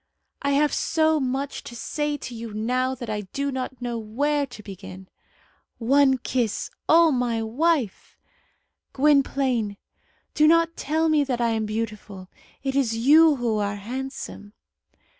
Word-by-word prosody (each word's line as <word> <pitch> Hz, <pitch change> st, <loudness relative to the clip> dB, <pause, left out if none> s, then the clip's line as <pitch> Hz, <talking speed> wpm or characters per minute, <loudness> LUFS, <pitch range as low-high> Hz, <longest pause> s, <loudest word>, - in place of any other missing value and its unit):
"I 280 Hz, 0 st, +1 dB
have 295 Hz, +1 st, +2 dB
so 315 Hz, -1 st, +2 dB
much 270 Hz, +1 st, -3 dB
to 240 Hz, -, -9 dB
say 295 Hz, +5 st, -2 dB
to 255 Hz, -, -8 dB
you 225 Hz, -2 st, -7 dB
now 255 Hz, +4 st, 0 dB
that 245 Hz, -2 st, -7 dB
I 210 Hz, -1 st, -2 dB
do 275 Hz, +9 st, -3 dB
not 260 Hz, -1 st, -5 dB
know 240 Hz, -1 st, -2 dB
where 285 Hz, +7 st, -1 dB
to 235 Hz, -4 st, -12 dB
begin." 190 Hz, -1 st, -10 dB, 0.7 s
"One 265 Hz, +2 st, +4 dB
kiss!" 245 Hz, -3 st, -2 dB, 0.2 s
"O 330 Hz, 0 st, +6 dB
my 240 Hz, -3 st, 0 dB
wife!" 265 Hz, -, -1 dB, 0.8 s
"Gwynplaine, 265 Hz, -6 st, +2 dB, 0.6 s
do 305 Hz, -, +4 dB
not 330 Hz, +1 st, +4 dB
tell 315 Hz, +3 st, 0 dB
me 305 Hz, -2 st, +3 dB
that 250 Hz, -3 st, -2 dB
I 235 Hz, -1 st, +2 dB
am 220 Hz, -1 st, -1 dB
beautiful. 210 Hz, -3 st, -5 dB, 0.3 s
It 270 Hz, -1 st, -2 dB
is 235 Hz, -5 st, +1 dB
you 300 Hz, +6 st, +6 dB
who 235 Hz, -4 st, -1 dB
are 200 Hz, -1 st, -1 dB
handsome." 235 Hz, -1 st, -7 dB
255 Hz, 145 wpm, -24 LUFS, 220-285 Hz, 0.8 s, O